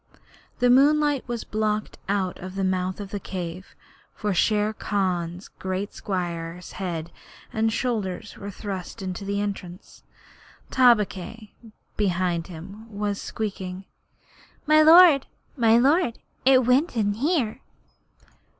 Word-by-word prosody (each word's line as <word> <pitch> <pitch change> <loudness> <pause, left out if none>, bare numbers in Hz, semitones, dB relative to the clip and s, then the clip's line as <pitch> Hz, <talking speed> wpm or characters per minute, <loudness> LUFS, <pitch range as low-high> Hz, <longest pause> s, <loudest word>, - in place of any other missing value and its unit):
The 245 0 +4
moonlight 290 +1 +4
was 240 -2 -3
blocked 215 0 -2
out 195 -2 -1
of 185 +1 -8
the 195 - -1
mouth 185 0 -1
of 200 -1 -7
the 205 - -3
cave, 180 -1 -6 0.4
for 210 -1 -1
Shere 210 +3 +2
Khan's 185 -4 -2
great 190 +2 -3
square 175 -3 -4
head 170 -4 -4 0.4
and 220 0 +1
shoulders 215 -5 -2
were 200 - -7
thrust 195 0 -6
into 185 +1 -4
the 200 +1 -2
entrance. 195 -3 -6 0.7
Tabaqui, 220 -3 +2 0.4
behind 180 -4 0
him, 195 +6 -10
was 205 -1 -2
squeaking: 190 -3 -5 0.8
'My 310 +1 +6
lord, 320 -3 +8 0.3
my 230 -4 +4
lord, 275 0 +3 0.3
it 260 -2 +6
went 255 +3 +2
in 205 -2 +2
here!' 260 - 0
205 Hz, 120 wpm, -25 LUFS, 185-235 Hz, 0.8 s, lord